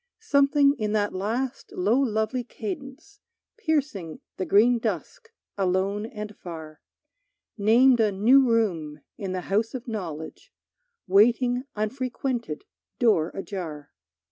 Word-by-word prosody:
Something 280 -5 +4
in 210 -1 -1
that 205 -1 +1
last 230 +7 -3
low 210 +8 +2
lovely 230 -1 0
cadence 270 - -8 0.4
Piercing 290 - -2 0.2
the 185 - -3
green 235 +4 +5
dusk 455 - -4 0.3
alone 195 +3 0
and 210 -2 -7
far, 160 -3 -9 0.7
Named 235 +4 +5
a 215 -2 +3
new 235 +8 +5
room 165 -10 0 0.2
in 195 -3 -3
the 185 - -2
house 215 +6 -1
of 250 -1 -6
knowledge, 170 -9 -6 0.5
Waiting 245 +6 +3
unfrequented, 240 - -3 0.3
door 210 -10 +3
ajar. 165 -7 -6
215 Hz, 115 wpm, -26 LUFS, 190-255 Hz, 0.7 s, green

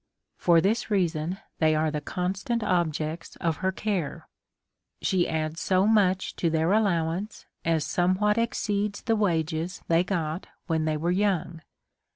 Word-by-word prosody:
For 170 -2 +4
this 220 +5 0
reason, 175 -3 0 0.2
they 155 -1 +4
are 155 0 +1
the 150 -1 -3
constant 195 +8 -2
objects 165 -3 -1
of 165 -2 -1
her 190 0 0
care; 190 -6 -3 0.7
she 185 -2 +1
adds 155 0 -2
so 185 0 +3
much 195 -4 +2
to 170 - +1
their 160 +2 +1
allowance, 190 -1 0 0.2
as 160 -3 +1
some 175 +5 +2
what 210 +3 +2
exceeds 210 -3 -1
the 225 -2 +2
wages 170 -3 -1
they 165 +1 +4
got 170 -3 -2 0.2
when 160 -3 0
they 155 -1 0
were 170 +3 0
young. 180 -4 0
175 Hz, 150 wpm, -27 LUFS, 160-200 Hz, 0.7 s, For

